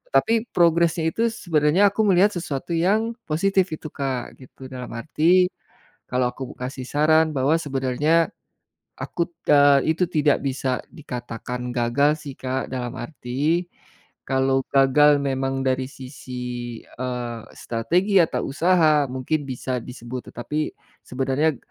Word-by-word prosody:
Tapi 230 +1 +3
progresnya 170 -1 +3
itu 230 +6 +1
sebenarnya 170 -1 +3
aku 220 - 0
melihat 195 +2 +5
sesuatu 165 -3 -4
yang 205 +7 +2 0.2
positif 190 +4 +2
itu, 155 - -9
Kak, 135 -3 -4
gitu. 130 +1 -13
Dalam 125 -1 -7
arti 165 +8 +3 0.6
kalau 125 0 +1
aku 130 -1 -7
kasih 130 +1 -5
saran 155 +2 +3
bahwa 135 +3 +2
sebenarnya 145 +3 +1 0.7
akut 170 - -3 0.2
eee, 145 +1 +5
itu 180 - +2
tidak 150 -4 +2
bisa 130 -1 -1
dikatakan 125 -2 -6
gagal 140 +6 +2
sih, 140 - -6
Kak. 130 0 -2
Dalam 125 -2 -3
arti 150 +6 -2 0.6
kalau 135 0 +2
gagal 145 +2 +5
memang 135 -1 -1
dari 130 0 +1
sisi, 130 -1 -11 0.5
eee, 125 -2 -5 0.2
strategi 175 - 0
atau 160 - -1
usaha, 155 -1 +3
mungkin 130 +4 -1
bisa 130 0 -3
disebut 125 0 -8
tetapi 150 +6 -3 0.3
sebenarnya 135 +3 0
140 Hz, 125 wpm, -23 LUFS, 130-165 Hz, 0.7 s, melihat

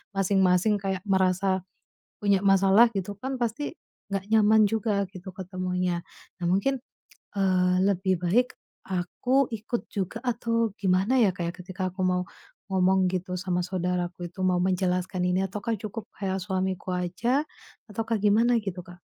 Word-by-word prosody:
masing-masing 195 +1 +3
kayak 190 -1 -2
merasa 190 0 +2 0.6
punya 200 -2 +3
masalah 195 +4 +6
gitu 195 +1 -3
kan 265 +3 -3
pasti 245 +7 -2 0.4
gak 195 -1 -2
nyaman 220 0 +6
juga 210 -2 0
gitu 190 0 -9
ketemunya. 180 -1 -2 0.4
Nah - - -1
mungkin, 260 +9 +1 0.6
eee, 185 -2 +3
lebih 190 -2 +1
baik 240 +8 +2 0.3
aku 240 +9 +1
ikut 225 +2 -3
juga 195 +1 -3
atau 230 -2 0
gimana 195 +7 +2
ya, 220 - +5
Kak, 175 - -4
ya, - - -9
ketika 185 +1 -7
aku 185 - -8
mau 180 0 +1 0.5
ngomong 190 0 +3
gitu 185 0 -2
sama 180 0 -1
saudaraku 180 -1 -2
itu 190 - -10
mau 185 -1 +3
menjelaskan 185 -1 0
ini, 185 +1 +1
ataukah 210 +4 -3
cukup 215 +1 -6
kayak 190 -1 -2
suamiku 185 -1 -2
aja 225 - 0 0.5
ataukah 225 +2 -1
gimana 225 +4 +4
gitu 190 -3 -4
Kak? 175 -1 -12
190 Hz, 145 wpm, -27 LUFS, 180-215 Hz, 0.6 s, masalah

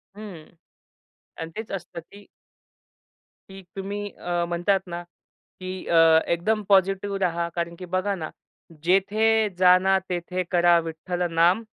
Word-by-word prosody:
हं. 200 -7 -10 0.9
आणि 165 0 -6
तेच 220 0 -6
असतं 175 -2 -6
की 205 0 -14 1.2
की 195 0 -11
तुम्ही 200 +1 -4
अ, 175 -1 -2
म्हणतात 175 +3 +1
ना, 175 0 -6
की 185 +1 -11
अ, 165 -1 +6
एकदम 210 +6 0
पॉझिटिव्ह 195 +1 +2
रहा 170 -2 0
कारण 170 0 -3
की 185 - -7
बघा 195 +2 0
ना, 160 -4 -5 0.5
जेथे 210 +4 +2
जाना 185 +1 +5
तेथे 180 +1 -2
करा 175 -1 +5
विठ्ठल 170 +2 -3
नाम, 175 +7 +3
185 Hz, 125 wpm, -24 LUFS, 170-195 Hz, 1.2 s, अ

